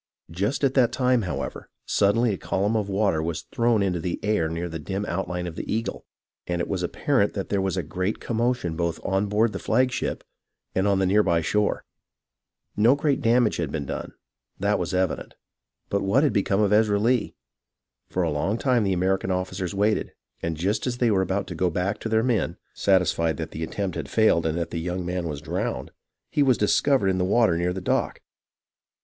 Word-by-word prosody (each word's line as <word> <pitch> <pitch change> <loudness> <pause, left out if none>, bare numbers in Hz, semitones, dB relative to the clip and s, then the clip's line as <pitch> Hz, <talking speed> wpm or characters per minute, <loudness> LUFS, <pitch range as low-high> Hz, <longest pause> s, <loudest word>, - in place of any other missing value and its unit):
Just 100 - -1
at 135 -1 +3
that 125 -4 +4
time, 125 -2 +2
however, 90 -4 -5 0.2
suddenly 105 +3 +2
a - - -3
column 100 +4 0
of 105 -2 -1
water 95 -5 +1
was 80 0 -3
thrown 115 -3 +1
into 90 -3 0
the 85 +1 -3
air 105 -6 +1
near 85 +2 -3
the 80 -1 -6
dim 95 +6 -3
outline 90 -1 -3
of 85 -2 -6
the - - -5
Eagle, 115 +2 -3 0.4
and 90 -1 -1
it 85 - -1
was 95 -3 -2
apparent 105 +5 +1
that 100 - -4
there 100 -1 +1
was 95 0 -1
a 90 - 0
great 90 +7 -2
commotion 115 -7 -1
both 85 0 -1
on 95 +1 +1
board 105 +2 +2
the 95 - -4
flagship 125 +3 0 0.5
and 95 +2 +1
on 100 -1 +3
the 95 - +2
near 100 +3 +4
by 85 -5 +2
shore. 105 +5 0 0.9
No 115 +6 +5
great 145 -1 0
damage 115 -1 +3
had 80 -5 -2
been 75 -3 -3
done, - - -5 0.5
that - - +1
was - - -2
evident, 95 -2 -1 0.5
but 100 - 0
what 110 +9 +3
had 145 -7 +2
become 100 0 +1
of 105 -1 +3
Ezra 105 -1 +4
Lee. 115 +2 +1 0.3
' - - -56
For 90 - 0
a 80 - 0
long 80 +9 0
time 125 -3 +2
the 95 -2 +1
American 95 +1 0
officers 95 0 -2
waited, 105 +2 +1 0.3
and 80 -1 -2
just 100 +9 -1
as 120 -1 -2
they 120 -2 +2
were 95 -2 +3
about 95 +1 -1
to - - -7
go 90 +2 +1
back 90 +5 -1
to 115 - -4
their 110 0 +2
men, 110 -8 0 0.2
satisfied 85 -5 +2
that - - -5
the 80 - -6
attempt 95 +2 -3
had 80 -5 -5
failed 85 -4 +3
and 80 +1 -1
that 85 - -3
the 85 - -2
young 90 +1 -3
man 90 -1 -2
was 75 -3 -5
drowned, 85 +4 -3 0.4
he 150 - +1
was 130 -3 +4
discovered 105 +1 +3
in 95 -1 0
the - - +2
water 105 -1 +3
near 85 +1 0
the 95 - -3
dock. - - -1
95 Hz, 210 wpm, -25 LUFS, 90-110 Hz, 0.9 s, No